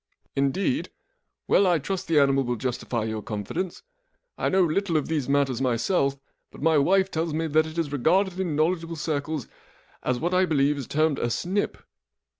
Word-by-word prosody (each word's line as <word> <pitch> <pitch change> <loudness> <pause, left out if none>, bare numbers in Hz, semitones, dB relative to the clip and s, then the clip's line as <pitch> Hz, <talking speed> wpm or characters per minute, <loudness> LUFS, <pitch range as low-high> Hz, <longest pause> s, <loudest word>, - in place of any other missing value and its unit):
" - - -48
indeed? 190 - 0 0.6
Well. 200 - +4
I 175 -2 +4
trust 180 +6 -4
the 165 - +2
animal 135 -1 +4
will 120 -1 -1
justify 120 -1 -2
your 110 -1 -3
confidence. 105 - -4 0.5
I - - 0
know 190 0 +4
little 170 +1 +1
of 150 - -1
these 150 -5 -1
matters 140 -3 +1
myself, 135 +3 +1 0.3
but - - -14
my 160 0 +3
wife 190 +6 +3
tells 160 -1 -1
me 165 +1 0
that 155 0 +2
it 160 +1 -9
is 160 -4 -1
regarded 185 +7 +2
in 175 -5 -1
knowledgeable 165 +2 0
circles 150 -2 -3 0.5
as 125 -1 -1
what 175 +3 -1
I 185 0 +3
believe 145 -2 +2
is 135 - -6
termed 155 -1 +1
a 120 - 0
snip." 190 - -1
155 Hz, 185 wpm, -25 LUFS, 135-175 Hz, 0.6 s, Well